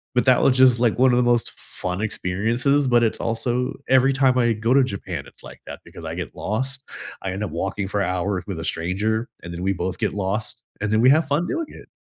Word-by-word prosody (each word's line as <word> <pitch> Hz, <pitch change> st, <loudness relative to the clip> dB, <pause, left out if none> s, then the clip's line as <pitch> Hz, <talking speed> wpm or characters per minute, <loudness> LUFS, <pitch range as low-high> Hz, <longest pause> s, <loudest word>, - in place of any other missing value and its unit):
but 125 Hz, -, +3 dB
that 130 Hz, -2 st, +5 dB
was 130 Hz, -1 st, +3 dB
just, 125 Hz, -2 st, +6 dB
like, 120 Hz, -3 st, +2 dB
one 130 Hz, -1 st, +5 dB
of 120 Hz, -, +3 dB
the 125 Hz, -, +3 dB
most 120 Hz, -1 st, +2 dB
fun 90 Hz, +2 st, -4 dB
experiences, 115 Hz, +7 st, 0 dB
but 120 Hz, -1 st, +4 dB
it's 110 Hz, -, 0 dB
also, 120 Hz, +2 st, -1 dB, 0.2 s
every 130 Hz, +1 st, +5 dB
time 130 Hz, -1 st, +3 dB
I 120 Hz, -2 st, +3 dB
go 115 Hz, +4 st, 0 dB
to 135 Hz, -1 st, +5 dB
Japan, 100 Hz, -6 st, -5 dB
it's, -, -, -18 dB
like, -, -, -12 dB
that -, -, -8 dB
because -, -, -11 dB
I -, -, -4 dB
get -, -, -6 dB
lost, 130 Hz, +6 st, -3 dB, 0.4 s
I 95 Hz, -, -2 dB
end 100 Hz, +3 st, -4 dB
up 90 Hz, -, -4 dB
walking 95 Hz, +3 st, -3 dB
for 100 Hz, 0 st, -1 dB
hours 95 Hz, 0 st, -1 dB
with 95 Hz, -5 st, -4 dB
a -, -, -5 dB
stranger, 105 Hz, +8 st, -1 dB, 0.2 s
and 85 Hz, 0 st, -7 dB
then 85 Hz, -, -6 dB
we 95 Hz, +1 st, +1 dB
both 90 Hz, 0 st, -3 dB
get -, -, 0 dB
lost, 105 Hz, +4 st, -3 dB, 0.2 s
and 105 Hz, -, -1 dB
then 110 Hz, +1 st, +3 dB
we 130 Hz, -, +6 dB
have 155 Hz, -1 st, +3 dB
fun 150 Hz, +4 st, +1 dB
doing 330 Hz, -2 st, -2 dB
it. -, -, -13 dB
115 Hz, 245 wpm, -22 LUFS, 95-130 Hz, 0.4 s, just